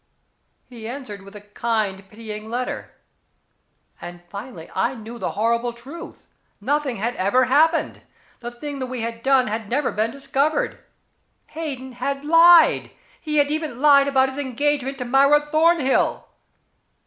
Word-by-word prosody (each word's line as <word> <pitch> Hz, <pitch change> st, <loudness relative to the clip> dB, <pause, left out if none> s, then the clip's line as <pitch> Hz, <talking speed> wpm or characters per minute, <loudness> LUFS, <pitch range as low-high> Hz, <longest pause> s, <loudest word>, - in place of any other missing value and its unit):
He 230 Hz, -3 st, -9 dB
answered 235 Hz, -6 st, -7 dB
with 195 Hz, +2 st, -14 dB
a 210 Hz, -, -9 dB
kind 205 Hz, -2 st, -3 dB
pitying 215 Hz, 0 st, -8 dB
letter 250 Hz, +2 st, -4 dB, 1.1 s
and 175 Hz, 0 st, -9 dB
finally 200 Hz, -3 st, -9 dB
I 235 Hz, +7 st, 0 dB
knew 230 Hz, +1 st, -9 dB
the -, -, -3 dB
horrible 235 Hz, +2 st, 0 dB
truth. 280 Hz, +9 st, -11 dB, 0.3 s
Nothing 290 Hz, -4 st, -1 dB
had 230 Hz, +4 st, -2 dB
ever 205 Hz, +8 st, +2 dB
happened. 315 Hz, +6 st, +2 dB, 0.4 s
The 240 Hz, -, -6 dB
thing 280 Hz, +4 st, -7 dB
we 255 Hz, -2 st, -4 dB
had 230 Hz, 0 st, -4 dB
done 265 Hz, 0 st, +3 dB
had 220 Hz, -1 st, -4 dB
never 275 Hz, +3 st, 0 dB
been 215 Hz, +2 st, 0 dB
discovered. 280 Hz, -, -1 dB, 0.7 s
Hayden 280 Hz, -5 st, -6 dB
had 275 Hz, +3 st, -4 dB
lied. 330 Hz, +1 st, +6 dB, 0.3 s
He 305 Hz, -2 st, -2 dB
had 290 Hz, 0 st, +3 dB
even 305 Hz, -5 st, -3 dB
lied 280 Hz, -1 st, +6 dB
about 265 Hz, -1 st, +3 dB
his 265 Hz, +2 st, -6 dB
engagement 275 Hz, 0 st, -1 dB
to 250 Hz, -, -5 dB
Myra 280 Hz, +4 st, +4 dB
Thornhill. 315 Hz, -3 st, +2 dB
255 Hz, 140 wpm, -22 LUFS, 230-290 Hz, 1.1 s, lied